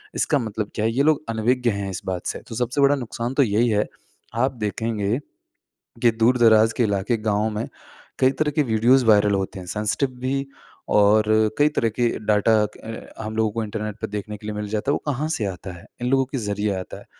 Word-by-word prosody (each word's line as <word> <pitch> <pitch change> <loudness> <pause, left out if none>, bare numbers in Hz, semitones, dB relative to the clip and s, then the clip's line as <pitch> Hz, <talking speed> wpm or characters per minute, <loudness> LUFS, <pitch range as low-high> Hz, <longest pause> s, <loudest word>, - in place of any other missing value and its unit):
इसका 145 - +1
मतलब 110 -3 -4
क्या 110 - 0
है? 115 - +2
ये 130 +5 +1
लोग 155 0 +2
अनविज्ञ 120 +2 +1
हैं 100 -1 -3
इस 95 - -5
बात 90 -2 -3
से, - - -3
तो 115 - -10
सबसे 125 +4 0
बड़ा 140 +1 +5
नुकसान 120 -1 -4
तो 140 - +4
यही 115 +1 +2
है। 105 -1 +1 0.5
आप 130 +3 +1
देखेंगे, 110 0 -1 0.9
कि 120 - +6
दूर-दराज 115 -1 +4
के - - +2
इलाके, 100 +3 0
गाँव 105 0 0
में 110 +3 -2 0.5
कई 130 - +5
तरह 150 +2 0
के 150 - +4
वीडियोज़ 120 +4 +4
वायरल 105 -2 +5
होते 95 0 -2
हैं, 90 - -9
सेंसिटिव 105 +8 -1
भी 135 +2 -1 0.5
और 105 +1 +5 0.3
कई 145 +1 +5
तरह 135 -6 0
के 120 -1 +3 0.2
डाटा 105 +1 +3
अ, 110 +2 -9
हम 110 0 -5
लोगों 110 -1 +2
को 115 +1 -2
इंटरनेट 105 -1 -4
पे - - -2
देखने 105 0 -5
के 105 - -11
लिए 105 - -3
मिल 105 0 -4
जाता 110 +5 -1
है, - - +3
वो - - -3
कहाँ 145 +4 -2
से 155 -9 -1
आता 95 0 -6
है? - - -15 0.2
इन 125 - 0
लोगों 135 0 +3
के 135 +1 -4
जरिए 105 -2 -1
आता 90 - -8
है। - - -15
110 Hz, 220 wpm, -23 LUFS, 105-125 Hz, 0.9 s, कि